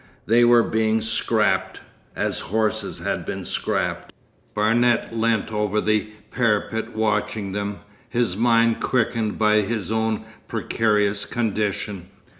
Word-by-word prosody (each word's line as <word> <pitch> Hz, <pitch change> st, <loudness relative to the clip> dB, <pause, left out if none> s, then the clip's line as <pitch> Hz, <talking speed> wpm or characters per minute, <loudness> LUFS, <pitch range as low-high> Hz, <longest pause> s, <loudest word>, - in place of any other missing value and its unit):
They 120 Hz, +2 st, +4 dB
were 120 Hz, 0 st, +6 dB
being 110 Hz, 0 st, +1 dB
'scrapped'—as 110 Hz, +1 st, -1 dB
horses 110 Hz, +1 st, -1 dB
had -, -, -3 dB
been -, -, -5 dB
'scrapped.' -, -, -2 dB, 0.4 s
Barnet 115 Hz, +3 st, +2 dB
leant 115 Hz, -1 st, 0 dB
over 105 Hz, 0 st, 0 dB
the 110 Hz, 0 st, +1 dB, 0.2 s
parapet 110 Hz, -1 st, 0 dB
watching 105 Hz, -2 st, -1 dB
them, 100 Hz, +1 st, -4 dB, 0.3 s
his 120 Hz, -6 st, 0 dB
mind 115 Hz, +1 st, +3 dB
quickened 115 Hz, -3 st, 0 dB
by 105 Hz, -1 st, +3 dB
his 105 Hz, -2 st, -3 dB
own 110 Hz, -1 st, -1 dB, 0.2 s
precarious 105 Hz, -2 st, 0 dB
condition. 105 Hz, -4 st, -2 dB
110 Hz, 110 wpm, -23 LUFS, 105-115 Hz, 0.4 s, were